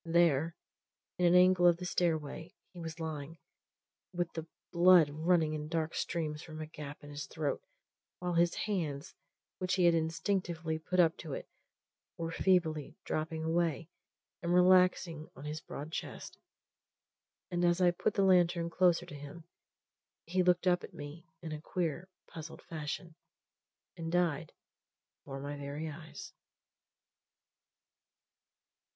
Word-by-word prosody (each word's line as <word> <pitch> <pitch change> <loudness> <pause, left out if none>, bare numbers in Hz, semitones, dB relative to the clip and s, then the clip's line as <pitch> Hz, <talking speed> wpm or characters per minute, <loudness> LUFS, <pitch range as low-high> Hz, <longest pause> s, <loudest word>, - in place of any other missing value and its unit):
There, 165 -2 +3 0.6
in 180 - +3
an 175 - +5
angle 180 -1 +6
of 170 -1 +5
the 180 - -6
stairway, 165 0 -1 0.2
he 175 - -10
was 165 0 -6
lying, 160 0 -5 0.7
with 175 -1 -2
the 160 0 -5 0.2
blood 175 -3 +6
running 160 +1 +2
in 150 0 -4
dark 160 0 -1
streams 155 -3 -2
from 155 -2 -9
a 155 - -4
gap 150 -2 -9
in 145 - -10
his 145 0 -5
throat; 155 -3 -2 0.6
while 180 0 -2
his 170 0 +3
hands, 165 -7 -2 0.5
which 185 -1 0
he 180 -2 +3
had 170 - +6
instinctively 165 -1 -1
put 180 +3 -2
up 165 -2 +5
to 155 -5 -6
it, - - -5 0.7
were 165 0 -3
feebly 165 -5 +1
dropping 160 +1 -2
away 165 -1 0 0.5
and 175 0 +1
relaxing 180 -3 +4
on 140 - -10
his 155 +1 -4
broad 150 +3 -7
chest. - - -6 1.1
And 175 0 0
as 175 0 +3
I 180 -1 +5
put 190 +4 -1
the 200 - +3
lantern 175 -2 +4
closer 175 -1 +3
to 175 - -11
him 145 +3 -9 0.8
he 185 +3 +1
looked 180 0 +3
up 180 -1 +3
at - - -10
me 145 +4 -9 0.2
in 160 - -5
a 155 -1 -5
queer, 175 +1 -2 0.2
puzzled 160 0 -9
fashion, 160 +2 -5 0.8
and 165 -1 -5
died 170 -4 +1 0.7
before 135 -1 -7
my 145 +1 -5
very 145 +3 -5
eyes. 155 +1 -10
165 Hz, 145 wpm, -33 LUFS, 155-175 Hz, 1.1 s, angle